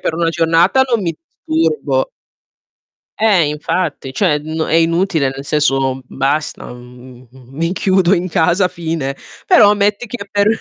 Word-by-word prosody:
per 160 - -2
una 165 0 0
giornata 165 +8 +2
non 235 -5 0
mi 170 -2 -2 0.3
disturbo. 450 +10 0 1.1
Eh, 200 -8 +4
infatti. 150 -2 -3
Cioè, 150 -3 +1
n 160 +1 -6
è - - -1
inutile 165 -3 +2
nel 135 +1 -8
senso 135 -3 0
basta, 145 -1 -2
mhmm, 125 0 -14
mi 135 +7 -5
chiudo 190 -1 +2
in 185 0 +1
casa, 175 +3 +2
fine. 160 -6 -4 0.3
Però 210 - +6
metti 205 +3 0
che 210 -2 -7
per 205 0 +1
165 Hz, 140 wpm, -16 LUFS, 140-200 Hz, 1.1 s, Però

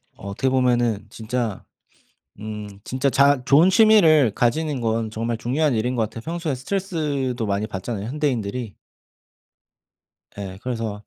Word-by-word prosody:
어 100 - -10
어떻게 130 +7 -1
보면은 120 -5 +1
진짜 115 -2 -3 0.8
음 105 -1 -6 0.2
진짜 130 +2 -1
자 140 0 +4
좋은 160 +9 +5
취미를 185 - +6
가지는 140 +3 0
건 115 -1 -1
정말 115 +1 -3
중요한 135 +4 0
일인 120 +3 0
것 115 - +1
같아요. 110 +1 -5
평소에 165 -2 -2
스트레스도 140 - -2
많이 100 +1 -1
받잖아요 105 +1 -5
현대인들이. 125 -6 -2 1.6
예. 95 -2 -6
그래서 115 -4 -4
125 Hz, 305 characters per minute, -22 LUFS, 110-145 Hz, 1.6 s, 취미를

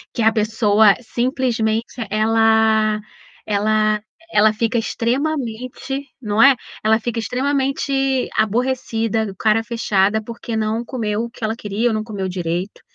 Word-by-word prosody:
Que - - -1
a 220 0 +5
pessoa 215 -1 +3
simplesmente, 235 -2 -1 0.2
ela 220 0 +3 0.4
ela 215 +1 +1 0.3
ela 215 +1 +4
fica 230 +2 0
extremamente 255 +2 -2
não 210 -1 +1
é, 275 +2 +8 0.3
ela 220 +1 +3
fica 235 0 -2
extremamente 270 +2 0
aborrecida, 225 -2 0
cara 220 +2 +2
fechada, 220 -2 +1
porque 235 +1 -6
não 220 +2 -1
comeu 225 -2 -2
o - - -8
que 235 - -13
ela 220 +1 0
queria 215 +2 -1
ou - - -1
não 215 0 -1
comeu 200 -4 -4
direito. 180 +1 -3
225 Hz, 130 wpm, -20 LUFS, 215-240 Hz, 0.4 s, é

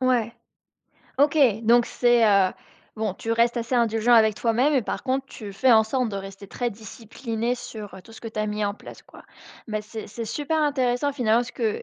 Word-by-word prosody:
Ouais. 245 -3 +1 0.9
OK, 290 +2 +3 0.3
donc 235 +1 +4
c'est, 240 -2 +2
heu 195 -2 +4 0.4
bon, 215 -3 -2
tu 225 - -6
restes 235 +1 +2
assez 235 +2 -3
indulgent 230 0 +3
avec 220 -2 +5
toi-même 240 +7 +1
et 275 - +3
par - - -4
contre, 270 0 -1
tu 210 -6 -9
fais 255 +6 +2
en 220 -1 +6
sorte 250 +1 -1
de 200 - -5
rester 195 0 -9
très 245 -1 -3
discipliné 225 +2 -5
sur 215 -5 -9
heu, 190 - -10
tout 225 - -16
ce - - -13
que 225 - -5
tu 220 - -8
as 215 - -1
mis 210 0 -2
en 200 - -1
place, - - -13
quoi. - - -16 0.5
Bah 215 0 -3
c'est 220 +1 -8
c'est 230 +2 -6
super 295 +7 -2
intéressant 275 -1 0
finalement, 235 -4 +2
parce 245 - -5
que 225 -3 -2
230 Hz, 215 wpm, -24 LUFS, 215-245 Hz, 0.9 s, en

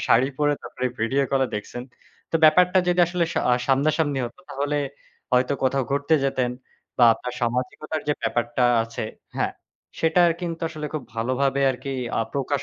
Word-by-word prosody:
শাড়ি 125 +4 +4
পরে 145 0 +3
তারপরে 130 - -3
ভিডিও 130 +5 +1
কলে 135 -1 +3
দেখছেন। 115 +4 -5 0.5
তো - - +2
ব্যাপারটা 180 +4 +6
যদি 180 0 +3
আসলে 175 0 0
স - - -9 0.2
আ - - +6
সামনাসামনি 145 +1 +2
হত 120 - -7
তাহলে 145 +2 -1 0.6
হয়তো 125 +2 +3
কোথাও 135 +1 +2
ঘুরতে 140 +3 +2
যেতেন 130 -2 0 0.5
বা 120 - +7
আপনার 125 +1 -6
সামাজিকতার 125 +6 -2
যে - - +4
ব্যাপারটা 120 +1 0 0.2
আছে 115 -1 -5 0.3
হ্যাঁ। - - 0 0.5
সেটা 165 +2 +4 0.2
কিন্তু 165 -2 -4
আসলে 155 -2 -6
খুব 150 - -2
ভালোভাবে 130 +4 0
আরকি 135 +2 -5 0.3
আ - - +2
প্রকাশ 140 0 -1
140 Hz, 160 wpm, -24 LUFS, 125-155 Hz, 0.6 s, বা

